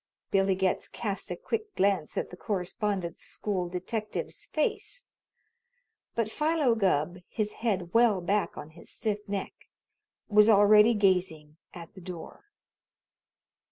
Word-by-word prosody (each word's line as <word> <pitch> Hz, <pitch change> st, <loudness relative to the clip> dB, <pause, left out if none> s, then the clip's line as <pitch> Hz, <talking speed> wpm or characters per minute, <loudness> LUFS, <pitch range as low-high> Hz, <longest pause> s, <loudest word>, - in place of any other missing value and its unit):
Billy 195 Hz, -1 st, +3 dB
Getz 190 Hz, 0 st, 0 dB
cast 200 Hz, -3 st, -3 dB
a -, -, -2 dB
quick 435 Hz, -3 st, -4 dB
glance 190 Hz, -5 st, +1 dB
at -, -, -2 dB
the -, -, -8 dB
Correspondence 190 Hz, -2 st, -2 dB
School 185 Hz, -4 st, -3 dB
detective's 210 Hz, +5 st, -4 dB
face, 435 Hz, +9 st, -2 dB, 1.1 s
but 225 Hz, -2 st, 0 dB
Philo 300 Hz, -2 st, +2 dB
Gubb, 180 Hz, -5 st, +1 dB
his 210 Hz, -2 st, -2 dB
head 190 Hz, -7 st, -1 dB
well 230 Hz, -4 st, +5 dB
back 200 Hz, +4 st, 0 dB
on 155 Hz, -, -8 dB
his 170 Hz, -, -11 dB
stiff 210 Hz, -2 st, -1 dB
neck, 200 Hz, -1 st, -3 dB, 0.7 s
was 210 Hz, 0 st, +6 dB
already 210 Hz, +2 st, +7 dB
gazing 180 Hz, -7 st, +1 dB, 0.2 s
at 170 Hz, -2 st, -10 dB
the 190 Hz, -, -12 dB
door. 175 Hz, -, -9 dB
200 Hz, 125 wpm, -29 LUFS, 180-220 Hz, 1.1 s, already